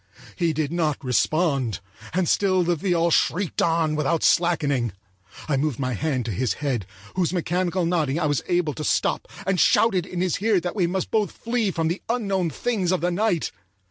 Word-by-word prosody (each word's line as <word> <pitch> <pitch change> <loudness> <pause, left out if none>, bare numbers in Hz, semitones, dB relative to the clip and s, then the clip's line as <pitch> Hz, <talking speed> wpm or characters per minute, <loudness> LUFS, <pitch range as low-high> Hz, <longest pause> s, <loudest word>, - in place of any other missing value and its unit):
He 170 -2 +1
did 155 -1 -2
not 160 -5 -1
respond, 135 - +1 0.3
and 180 +1 0
still 185 0 +2
the 175 0 +1
viol 170 0 +1
shrieked 180 +3 +1
on 165 -2 +2
without 150 +2 0
slackening. 145 - +2 0.5
I 145 -3 +1
moved 140 -3 0
my 130 -2 -2
hand 130 -1 -1
to 115 - -2
his 110 +1 0
head, 125 -7 -2 0.3
whose 180 -3 +1
mechanical 180 0 0
nodding 165 -4 0
I 165 - 0
was 145 -2 +1
able 175 -4 +1
to 155 - -6
stop, - - 0 0.2
and 190 -1 +1
shouted 190 -3 +3
in 180 - -5
his 180 0 0
ear 215 -3 +3
that 175 +2 -4
we 185 -5 +2
must 185 +2 -2
both 215 -2 +1
flee 230 -3 -1
from 165 -3 -1
the 170 +4 -2
unknown 195 -7 0
things 195 -1 -1
of 185 - 0
the 175 +1 +1
night. 180 -2 0
170 Hz, 190 wpm, -24 LUFS, 150-185 Hz, 0.5 s, shouted